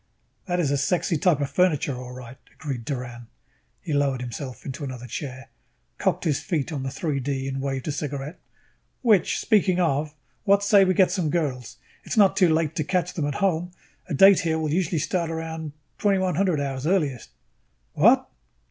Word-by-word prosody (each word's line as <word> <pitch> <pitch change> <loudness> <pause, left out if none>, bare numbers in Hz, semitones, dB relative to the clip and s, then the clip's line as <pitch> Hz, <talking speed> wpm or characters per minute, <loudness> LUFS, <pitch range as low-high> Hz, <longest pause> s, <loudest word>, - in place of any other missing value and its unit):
"That 180 -1 0
is 150 -5 +1
a 140 - +1
sexy 170 +4 +1
type 155 -2 +2
of 140 - -2
furniture, 155 -7 +2
all 125 0 -8
right," 125 0 -10 0.2
agreed 135 -7 -5
Doran. 125 -4 -5 0.5
He 155 - -4
lowered 140 -2 +1
himself 125 0 -7
into 140 +1 -6
another 130 -3 -6
chair, 130 +2 -7 0.5
cocked - - 0
his 145 -4 +1
feet 160 -4 -2
on 145 -4 -3
the 135 - -3
3 140 +1 -2
D 135 0 -2
and 135 0 -3
waved 135 0 -3
a - - 0
cigarette. 145 +2 -5 0.6
"Which 215 -7 +3
speaking 190 -5 +2
of, 150 -2 0 0.3
what 200 -1 +3
say 200 -1 +6
we 185 0 +1
get 185 0 +4
some 175 -6 0
girls? 140 -8 -2 0.3
It - - -5
is - - -3
not 200 -3 +5
too 180 -3 +4
late 160 -1 +1
to 155 - +1
catch 180 +2 -1
them 160 -6 -1
at 145 - -3
home. 180 -2 0 0.4
A - - -1
date 195 +5 +7
here 160 -1 0
will 155 -2 -1
usually 175 -1 0
start 165 +2 -1
around 160 -1 -5 0.3
2100 185 -4 +1
hours 135 0 -3
earliest." 150 - 0 0.6
"What?" - - +4
150 Hz, 185 wpm, -24 LUFS, 135-180 Hz, 0.6 s, date